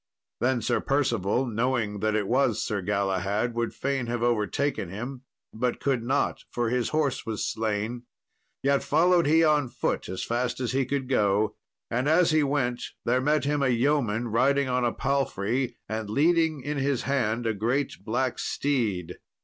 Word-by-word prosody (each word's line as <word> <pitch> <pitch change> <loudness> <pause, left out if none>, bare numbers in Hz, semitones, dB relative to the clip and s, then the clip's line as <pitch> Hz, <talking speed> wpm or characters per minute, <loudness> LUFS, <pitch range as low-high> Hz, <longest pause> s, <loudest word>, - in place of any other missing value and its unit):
Then 125 -2 +1
Sir - - +1
Percival, 125 -4 +1
knowing 115 -3 -1
that 110 +1 0
it 105 -2 0
was 125 -2 +2
Sir 100 -2 -2
Galahad, 100 +3 0
would 115 0 -1
fain 135 -3 -2
have 120 0 -2
overtaken 120 -1 0
him, 125 +7 -6 0.3
but 120 +2 -1
could 135 -4 0
not, 130 +5 0
for 120 -1 -1
his 125 -1 0
horse 155 -4 0
was 110 -3 -3
slain. 110 +2 -2 0.6
Yet 140 0 +3
followed 170 +2 +3
he 160 +2 +5
on 150 -3 +3
foot - - -2
as 95 - -4
fast 120 +1 -1
as 125 -3 -1
he 135 0 0
could 135 -1 -2
go; 105 -4 +2 0.4
and 125 +5 +1
as 165 +1 +4
he 155 0 +4
went 135 -4 0 0.2
there 125 +2 +2
met 150 +1 +2
him 145 0 0
a 135 - +3
yeoman 120 -3 +1
riding 140 +5 +2
on 125 -1 0
a 120 - +2
palfrey, 130 -3 -1
and 110 -1 -4
leading 160 +3 +2
in 145 +2 -3
his 135 -2 0
hand 120 -4 0
a 115 - +1
great 120 +7 -1
black 125 +3 -1
steed. 105 - -1
125 Hz, 170 wpm, -27 LUFS, 110-140 Hz, 0.6 s, he